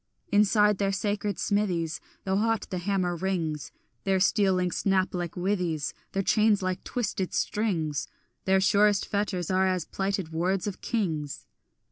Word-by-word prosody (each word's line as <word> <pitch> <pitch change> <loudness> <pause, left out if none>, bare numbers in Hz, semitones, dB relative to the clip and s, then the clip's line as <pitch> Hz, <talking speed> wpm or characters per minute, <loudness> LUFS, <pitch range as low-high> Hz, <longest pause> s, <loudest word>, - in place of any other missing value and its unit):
Inside 210 0 +4
their 195 -1 +1
sacred 205 0 -1
smithies 175 -6 0 0.2
Though 190 0 0
hot 225 +1 +1
the 185 - -2
hammer 180 -1 0
rings, 165 -5 -2 0.3
Their 190 -1 +2
steel 195 0 +3
links 180 -1 0
snap 190 -1 +1
like 175 -2 -3
withies, 180 -5 -1 0.2
Their 195 - 0
chains 215 -1 +3
like 185 0 -2
twisted 200 -6 -2
strings, 165 -9 -1 0.4
Their 190 0 +4
surest 205 0 +4
fetters 200 -4 -1
are 190 0 +3
as 185 -3 0
plighted 195 -4 -2
words 180 +3 0
of 205 -3 -5
kings. 160 - -2
190 Hz, 145 wpm, -27 LUFS, 180-205 Hz, 0.4 s, Inside